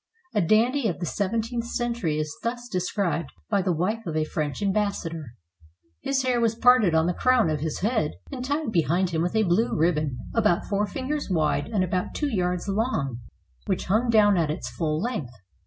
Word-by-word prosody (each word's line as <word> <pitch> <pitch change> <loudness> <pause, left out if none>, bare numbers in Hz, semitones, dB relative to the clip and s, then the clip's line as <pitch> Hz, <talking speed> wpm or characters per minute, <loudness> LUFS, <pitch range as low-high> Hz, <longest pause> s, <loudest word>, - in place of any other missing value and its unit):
A 210 - +2
dandy 230 +8 +3
of 180 - -2
the 175 - -2
seventeenth 230 +6 -2
century 235 -11 -1
is 155 -1 -3
thus 240 +1 -3
described 180 - -1 0.2
by 200 -2 +3
the 185 -1 0
wife 210 +7 -1
of 155 -1 -2
a 155 - +2
French 155 +4 -3
ambassador: 180 - -2 0.7
"His 270 -1 0
hair 250 -2 +1
was 230 -1 +2
parted 235 -7 +5
on 160 0 +4
the 180 - +1
crown 250 -5 +3
of 150 - -1
his 155 +1 -3
head, 205 -7 +1 0.2
and 250 -2 -5
tied 285 -1 -1
behind 175 0 +1
him 160 -1 0
with 175 +5 -1
a 220 - +4
blue 195 +5 +2
ribbon, 155 -5 +1 0.2
about 210 -6 +2
four 205 0 0
fingers 280 +4 -3
wide 160 -5 +1
and 210 -4 0
about 180 0 -2
two 285 -6 -1
yards 180 0 -1
long, 195 - -1 0.5
which - - -1
hung 220 +6 +1
down 210 -3 +5
at 165 -3 +1
its 155 +4 -4
full 155 -2 -1
length. 180 - -3
195 Hz, 190 wpm, -25 LUFS, 165-230 Hz, 0.7 s, parted